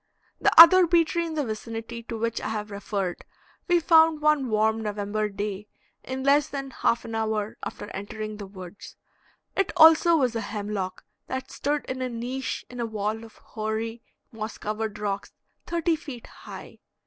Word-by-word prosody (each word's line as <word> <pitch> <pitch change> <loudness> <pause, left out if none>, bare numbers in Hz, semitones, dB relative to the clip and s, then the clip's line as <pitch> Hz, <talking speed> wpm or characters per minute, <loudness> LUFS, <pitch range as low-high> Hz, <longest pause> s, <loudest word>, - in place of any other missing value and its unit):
The - - +3
other 350 +2 +10
bee 335 -1 +4
tree 340 +1 -1
in 320 - -5
the 295 -2 0
vicinity, 225 +1 -6
to 230 - -3
which 230 +1 -2
I - - -3
have 210 -1 -4
referred, 200 -2 -3 0.4
we 350 -1 +4
found 320 -1 +5
one 300 -4 +2
warm 220 +1 +2
November 210 0 -2
day 205 0 -4 0.4
in 260 0 -5
less 285 +2 +4
than 275 -1 -5
half 235 -1 0
an 225 - -7
hour 220 -1 -1
after - - -6
entering 215 +2 -6
the 200 -2 -7
woods. 185 -1 -11 0.6
It 390 - +1
also 325 +1 +7
was 255 -5 +1
a 225 - -1
hemlock, 205 -4 -4 0.2
that 260 0 -5
stood 290 +1 -2
in 260 0 -4
a 255 - -1
niche 250 +3 -4
in 245 - -10
a 235 - 0
wall 215 +1 -3
of 225 - -13
hoary, 220 +1 -4 0.3
moss 220 -1 -6
covered 215 0 -3
rocks 200 -1 -3 0.3
thirty 335 -1 +1
feet 280 -7 -9
high. - - -11
225 Hz, 170 wpm, -26 LUFS, 210-280 Hz, 0.6 s, other